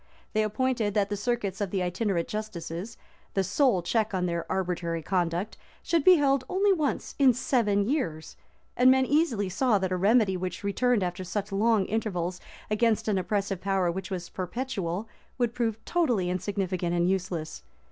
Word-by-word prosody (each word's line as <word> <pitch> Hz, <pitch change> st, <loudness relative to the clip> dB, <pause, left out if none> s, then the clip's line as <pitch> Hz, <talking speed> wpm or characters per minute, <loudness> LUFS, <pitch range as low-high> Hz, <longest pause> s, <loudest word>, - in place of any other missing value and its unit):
They 215 Hz, -, +2 dB
appointed 220 Hz, -1 st, 0 dB
that 200 Hz, -1 st, +2 dB
the -, -, +1 dB
circuits 210 Hz, -3 st, -2 dB
of 200 Hz, -, -1 dB
the 185 Hz, -1 st, -1 dB
itinerant 180 Hz, -1 st, -1 dB
justices, 210 Hz, -1 st, -5 dB, 0.4 s
the 195 Hz, -, +2 dB
sole 220 Hz, -, +2 dB
check 215 Hz, +2 st, 0 dB
on 180 Hz, -1 st, 0 dB
their 170 Hz, -1 st, -3 dB
arbitrary 175 Hz, -3 st, -2 dB
conduct, 180 Hz, +2 st, -1 dB, 0.3 s
should 335 Hz, -3 st, +1 dB
be 370 Hz, +3 st, +8 dB
held 275 Hz, -4 st, +2 dB
only 390 Hz, +2 st, +3 dB
once 305 Hz, -6 st, -2 dB
in 260 Hz, -4 st, +6 dB
seven 210 Hz, -6 st, +1 dB
years, 170 Hz, -, -2 dB, 0.4 s
and 250 Hz, +1 st, +5 dB
men 265 Hz, 0 st, +5 dB
easily 270 Hz, -, +1 dB
saw 210 Hz, +4 st, +2 dB
that 190 Hz, -1 st, -2 dB
a -, -, +1 dB
remedy 205 Hz, +1 st, +3 dB
which 180 Hz, +1 st, -4 dB
returned 215 Hz, +2 st, +1 dB
after 180 Hz, +1 st, -3 dB
such 200 Hz, +3 st, -4 dB
long 210 Hz, 0 st, +2 dB
intervals, 185 Hz, -5 st, -2 dB, 0.3 s
against 220 Hz, 0 st, +2 dB
an 200 Hz, -3 st, +2 dB
oppressive 195 Hz, 0 st, -2 dB
power 190 Hz, -2 st, +1 dB
which 190 Hz, +1 st, -5 dB
was 180 Hz, -2 st, -4 dB
perpetual, 195 Hz, -1 st, -4 dB, 0.3 s
would 240 Hz, -2 st, 0 dB
prove 225 Hz, -3 st, -1 dB
totally 240 Hz, -, +1 dB
insignificant 185 Hz, -2 st, -2 dB
and 175 Hz, 0 st, +2 dB
useless. 180 Hz, -4 st, -2 dB
200 Hz, 165 wpm, -27 LUFS, 180-235 Hz, 0.4 s, be